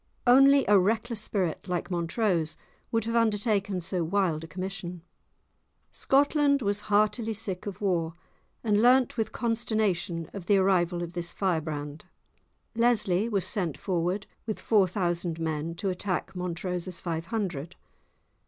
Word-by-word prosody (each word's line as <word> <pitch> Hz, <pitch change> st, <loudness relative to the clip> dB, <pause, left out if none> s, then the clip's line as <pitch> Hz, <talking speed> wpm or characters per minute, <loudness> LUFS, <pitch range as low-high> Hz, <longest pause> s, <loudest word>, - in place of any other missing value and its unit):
Only 275 Hz, +2 st, +6 dB
a 205 Hz, -1 st, +6 dB
reckless 220 Hz, +3 st, 0 dB
spirit 185 Hz, -5 st, -2 dB
like 180 Hz, +1 st, -2 dB
Montrose 170 Hz, -1 st, 0 dB, 0.3 s
would 225 Hz, -2 st, 0 dB
have 230 Hz, -, -2 dB
undertaken 210 Hz, -4 st, +1 dB
so 175 Hz, +1 st, -1 dB
wild 170 Hz, -3 st, 0 dB
a -, -, -7 dB
commission. 185 Hz, -1 st, -6 dB, 0.9 s
Scotland 280 Hz, 0 st, +2 dB
was 205 Hz, 0 st, 0 dB
heartily 215 Hz, +2 st, +2 dB
sick 195 Hz, -3 st, -5 dB
of 200 Hz, 0 st, -6 dB
war, 170 Hz, -5 st, 0 dB, 0.5 s
and 210 Hz, -2 st, +3 dB
learnt 250 Hz, +1 st, +4 dB
with 220 Hz, -2 st, -1 dB
consternation 215 Hz, -8 st, -1 dB
of 190 Hz, -3 st, -7 dB
the 205 Hz, -, +5 dB
arrival 180 Hz, -2 st, +2 dB
of 170 Hz, 0 st, -7 dB
this 175 Hz, -1 st, -4 dB
firebrand. 155 Hz, -5 st, -2 dB, 0.7 s
Lesly 225 Hz, -3 st, +2 dB
was 200 Hz, -5 st, 0 dB
sent 175 Hz, -, -2 dB
forward 180 Hz, +2 st, -1 dB, 0.2 s
with 215 Hz, -, -3 dB
four 205 Hz, -4 st, +3 dB
thousand 175 Hz, -3 st, -1 dB
men 160 Hz, 0 st, -2 dB
to 195 Hz, +3 st, -2 dB
attack 185 Hz, +1 st, -3 dB
Montrose's 180 Hz, 0 st, -3 dB
five 165 Hz, -1 st, -4 dB
hundred! 180 Hz, -9 st, -3 dB
190 Hz, 135 wpm, -28 LUFS, 170-215 Hz, 0.9 s, Only